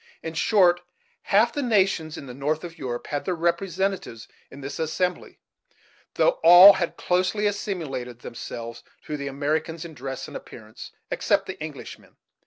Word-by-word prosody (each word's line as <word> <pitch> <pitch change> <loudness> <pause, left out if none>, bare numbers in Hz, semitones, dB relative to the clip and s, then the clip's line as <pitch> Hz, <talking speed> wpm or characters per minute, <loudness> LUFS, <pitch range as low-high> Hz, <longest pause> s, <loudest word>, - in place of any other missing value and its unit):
In 160 - -5
short, 175 0 +3 0.4
half 215 +4 +3
the 290 - -2
nations 195 - +1
in - - -8
the 125 - -9
north 150 +5 -2
of 170 -1 -8
Europe 120 -2 -4
had 145 - -3
their 185 - -2
representatives 170 - -2 0.2
in 140 - -12
this 140 +1 -6
assembly, 160 +3 -2 0.8
though - - +2
all 175 +4 +10
had 170 -3 -3
closely 185 +4 0
assimilated 150 - -3
themselves 115 0 -7 0.2
to 150 - -5
the 140 -1 -5
Americans 155 +4 -2
in 165 - -9
dress 135 -1 -6
and - - -11
appearance, 110 -1 -10 0.2
except - - +1
the - - -8
English - - -7
man. - - -23
160 Hz, 160 wpm, -24 LUFS, 140-185 Hz, 0.8 s, all